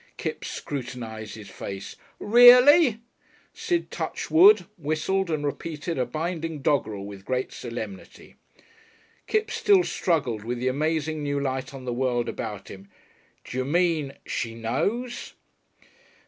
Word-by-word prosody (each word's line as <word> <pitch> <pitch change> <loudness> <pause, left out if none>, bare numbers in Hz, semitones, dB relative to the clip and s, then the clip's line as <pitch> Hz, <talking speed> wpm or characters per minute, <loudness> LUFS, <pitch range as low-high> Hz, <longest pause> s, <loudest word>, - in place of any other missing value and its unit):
_" - - -43
Kipps - - -4
scrutinised 120 -6 -6
his 105 -2 -11
face. 100 0 -7 0.2
"Reely?" 245 +3 +7 0.5
Sid 345 -1 -2
touched - - -4
wood, 375 - +7
whistled, 170 +4 -1
and 155 -2 -1
repeated 155 +1 -4
a 125 - 0
binding 160 +1 -4
doggerel 110 -9 0
with 100 -1 -9
great 130 +4 -2
solemnity. 110 -5 -8 0.9
Kipps 440 +1 0
still 405 -4 +4
struggled 140 - -1
with 120 +2 -3
the 125 +2 -2
amazing 155 +2 -1
new 145 -1 -1
light 130 -1 -3
on 135 -2 -9
the 125 - -2
world 120 -1 0
about 105 -2 -5
him. 95 +1 -11 0.5
"D'you 130 +1 -3
mean 160 -1 +1
she 115 -1 -3
knows?" 200 - -2
145 Hz, 130 wpm, -25 LUFS, 120-175 Hz, 0.9 s, Reely